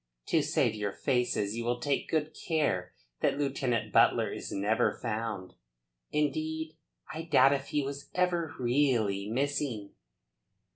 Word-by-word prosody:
To - - +4
save - - +1
your 105 -2 -3
faces 120 -5 0
you 115 - -3
will 120 +1 0
take 140 +3 -1
good 155 -1 0
care 120 - -1 0.2
that - - +1
Lieutenant 130 -6 -1
Butler - - +4
is - - -6
never 105 +3 +1
found. 110 -5 -3 0.6
Indeed 155 +2 -1 0.4
I 160 - -4
doubt 140 -4 +5
if 140 0 -2
he 145 - 0
was 140 +1 -6
ever 175 -3 +1
really 120 -6 +1
missing." 130 -4 -1
135 Hz, 135 wpm, -30 LUFS, 110-150 Hz, 0.6 s, doubt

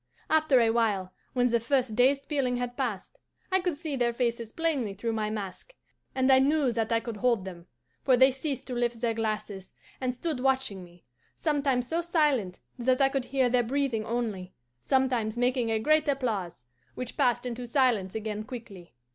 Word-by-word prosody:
After 310 -4 +4
a 230 -1 +4
while, 205 -5 0 0.2
when 245 -1 +2
the 235 -1 +3
first 245 -1 0
dazed 270 +4 +3
feeling 265 -5 0
had 245 0 -3
passed, 250 - -4 0.3
I 380 - +4
could 355 -4 -2
see 310 -2 -4
their 240 -2 +1
faces 235 -2 -2
plainly 280 -11 -1
through 230 +4 -2
my 215 -1 -1
mask, 215 - -6 0.4
and 260 0 +3
I 260 - +7
knew 280 -1 +2
that 225 -1 -1
I 230 - +3
could 230 -2 -6
hold 235 -4 +1
them; 175 -2 -9 0.3
for 255 -2 +4
they 260 +2 +6
ceased 270 +1 -4
to 255 - -6
lift 240 -1 -1
their 230 -1 0
glasses, 215 -3 -4 0.3
and 255 -1 0
stood 275 +3 -3
watching 260 -8 0
me, 175 0 -17 0.3
sometimes 275 -5 0
so 330 +4 0
silent 295 - +1 0.2
that 255 +1 +2
I 270 -1 +4
could 270 -2 -2
hear 265 -1 +1
their 245 0 +3
breathing 250 -2 -1
only, 215 -5 -3 0.3
sometimes 250 -4 +1
making 245 -1 +1
a 225 - +1
great 310 +8 +2
applause, 215 - -2 0.3
which 250 -1 -6
passed 245 0 +1
into 245 0 -5
silence 235 -7 +1
again 215 -1 -3
quickly. 210 - -10
245 Hz, 185 wpm, -28 LUFS, 220-270 Hz, 0.4 s, I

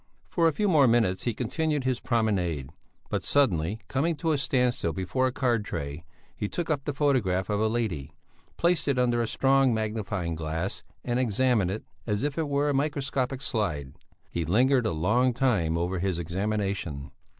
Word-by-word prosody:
For 170 -2 +3
a - - +4
few 210 +7 0
more 150 -8 +5
minutes 115 -6 +2
he 120 - +1
continued 155 -1 -1
his 130 -2 0
promenade, 90 - 0 0.4
but - - 0
suddenly, 105 - +1
coming 160 +5 0
to 160 +1 -1
a 150 - +2
standstill 125 - +1
before 110 +8 0
a - - -1
card 120 -4 +1
tray, 70 -3 -5 0.3
he 105 - -3
took 170 -2 -2
up 140 -3 -1
the 145 - -1
photograph 110 -10 +1
of 105 - +1
a 110 - +2
lady, 110 -12 -2 0.5
placed 170 -1 +2
it 140 -2 +2
under 120 -1 +2
a 115 - 0
strong 135 0 +3
magnifying 105 -5 -2
glass 80 +3 -3 0.2
and 120 0 0
examined 120 -4 +2
it 105 +4 -4 0.2
as 105 -1 0
if 145 -1 -1
it 155 -2 -1
were 140 +1 +1
a - - +1
microscopic 135 -2 -1
slide. 80 - -2 0.4
He 85 - -1
lingered 120 - +3
a - - 0
long 115 +10 +2
time 100 -11 +1
over 90 +2 -1
his 95 -1 0
examination. 95 -5 -2
115 Hz, 180 wpm, -27 LUFS, 90-135 Hz, 0.5 s, more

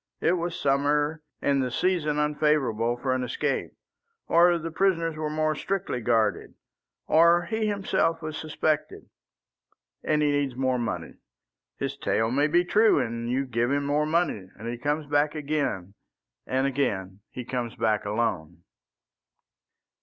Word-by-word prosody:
It - - +2
was 175 -1 -2
summer, 145 +3 +1 0.2
and 140 -1 +2
the 130 - -1
season 155 +1 0
unfavourable 150 -6 +1
for 130 +1 -1
an 130 0 -1
escape. 125 - -2 0.5
Or 175 +1 +5
the 165 0 -5
prisoners 165 -2 +1
were 155 -1 -3
more 155 0 0
strictly 190 -5 -3
guarded. 115 -1 0 0.5
Or 170 +2 +5
he 220 +3 -1
himself 195 -5 0
was 155 -1 -6
suspected. 155 0 -2 0.9
And 150 -1 +1
he 145 - +3
needs 140 -3 0
more 130 -1 0
money. 120 - -4 0.6
His - - -3
tale 110 +1 0
may 145 +4 +2
be 175 +3 +2
true, 215 +4 +4
and 115 0 -3
you 130 +2 0
give 120 -1 0
him 140 0 0
more 150 +2 +1
money; 155 - 0
and 110 +3 -8
he 120 0 -4
comes 150 +3 -1
back 145 +1 +1
again, 140 -11 -2 0.5
and 130 +1 +1
again 100 -9 -1
he 125 - -7
comes 125 -2 -3
back 110 -2 +1
alone." 95 -6 -2
145 Hz, 145 wpm, -26 LUFS, 120-155 Hz, 0.9 s, Or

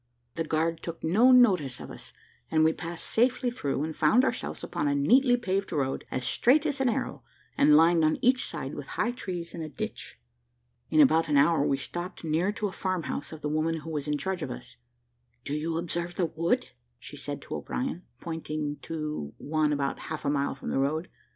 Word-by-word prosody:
The 165 - -2
guard 160 +1 0
took 170 -1 -7
no 215 +11 +5
notice 185 - +4
of - - -8
us, - - -11 0.4
and 155 - +3
we 160 0 +4
passed 170 0 -6
safely 245 +1 +2
through, 145 - -2
and 160 0 -4
found 220 - +4
ourselves - - -3
upon 145 - -2
a 145 - +2
neatly 245 - +4
paved 195 -4 -1
road, 140 -5 -1
as 130 -1 -3
straight 280 - +3
as 285 -3 -1
an 260 - +3
arrow, - - -3 0.3
and 150 0 +6
lined 165 +1 +5
on 155 0 +3
each 255 0 +3
side - - -4
with - - -7
high 240 - +1
trees 180 -8 -6
and 165 - -6
a 155 - -5
ditch. 215 +7 -6 0.7
In 310 - +5
about 165 - +4
an 145 - +3
hour 145 +1 +4
we 140 - +1
stopped 175 +7 -6
near 165 +5 +1
to 210 0 -3
the 200 - -1
farm 185 -3 -2
house 145 - -4
of 160 -1 -9
the 150 - -2
woman 155 +1 0
who 160 +1 -7
was 150 -2 -3
in 150 0 0
charge 190 +2 -3
of 135 - -3
us. 125 0 -8 0.7
"Do 140 - -4
you 160 +2 -1
observe 170 +1 -3
that 170 -3 -1
wood?" 165 +2 0 0.3
said - - -10
she - - -4
to - - -4
O'Brien, - - -3 0.2
pointing 155 -2 -4
to 150 - -5
one 155 0 0
about 140 -1 -1
half 155 -1 -5
a 140 - +2
mile 140 -1 0
from 135 - -6
the - - +1
road. 155 +6 -1
165 Hz, 210 wpm, -28 LUFS, 150-190 Hz, 0.7 s, and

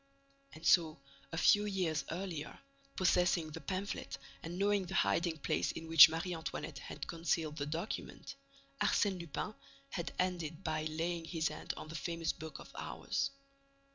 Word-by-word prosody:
And 160 +1 -11
so, 160 -5 +5 0.3
a 165 - -4
few 205 +4 +6
years 180 -7 0
earlier, 170 -3 -4 0.4
possessing 180 -3 +3
the - - -7
pamphlet 195 +1 -3 0.2
and 170 +2 -6
knowing 200 -1 +2
the - - -4
hiding 160 - +2
place 145 - 0
in 165 - -7
which 160 -1 +11
Marie 165 +3 -2
Antoinette 160 -3 -5
had - - -6
concealed 165 -2 -1
the 145 - -2
document, 165 +7 -4 0.5
Arsène 195 -3 +3
Lupin 170 +5 -4 0.4
had 170 -2 -3
ended 175 -2 -1
by 155 -2 -1
laying 165 +2 -2
his 160 -2 0
hand - - -5
on - - -7
the - - -7
famous 165 0 -2
book 160 -1 -8
of - - -12
hours. 275 - -2
165 Hz, 155 wpm, -35 LUFS, 160-180 Hz, 0.5 s, which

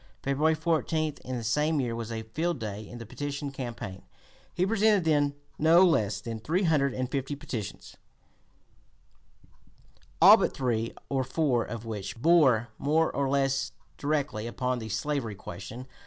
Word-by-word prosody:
February 150 +4 +2
14, 155 -1 0
in 130 0 -4
the 115 - -5
same 150 +7 +1
year, 120 -3 -1
was 115 -1 -5
a 110 -1 -4
field 160 +9 -2
day 105 -2 -6
in 120 - -8
the 115 - -8
petition 145 +4 -4
campaign: 120 -8 -6 0.5
he 180 - 0
presented 210 -2 +3
then 145 -3 +2 0.2
no 165 +4 +6
less 105 - +1
than 115 0 -5
three 165 - 0
hundred 150 -5 +3
and 130 0 -3
fifty 140 +1 -2
petitions, 115 -7 -6 2.2
all - - +10
but - - 0
three 115 -3 0 0.2
or 135 -1 0
four 130 -2 +1
of 115 0 -7
which 105 -2 -5
bore 130 -7 +4
more 155 +3 +1
or 140 -1 0
less 135 -1 +1 0.3
directly 140 -7 -1
upon 125 +1 -2
the 110 -1 -6
slavery 135 -4 -2
question. 100 +7 -8
135 Hz, 155 wpm, -28 LUFS, 115-155 Hz, 2.2 s, all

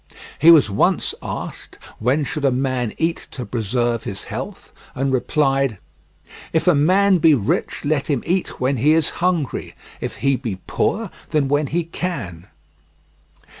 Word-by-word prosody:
He 160 - +6
was 160 -7 +8
once 100 - +1
asked - - -7 0.2
when 130 +7 +1
should 145 +1 -4
a 135 - +4
man 130 -3 -1
eat 165 +1 -1
to 125 - -6
preserve 120 +1 -1
his 100 - -5
health, - - -7 0.2
and 135 +1 0
replied: 135 -2 +1 0.8
"If - - +1
the - - +5
man 185 +6 +4
be 160 -2 +6
rich 110 +3 -1
let 145 -1 0
him 140 -5 0
eat 180 +2 -1
when 130 +1 +1
he 145 +7 +4
is 160 -1 +2
hungry; 175 -6 -1 0.2
if - - -5
he 140 -1 +1
be 115 -8 -4
poor, 220 -3 -1 0.2
then 150 -3 +1
when 145 +1 +1
he 170 +5 -1
can." 115 - -5
140 Hz, 155 wpm, -21 LUFS, 125-160 Hz, 0.8 s, was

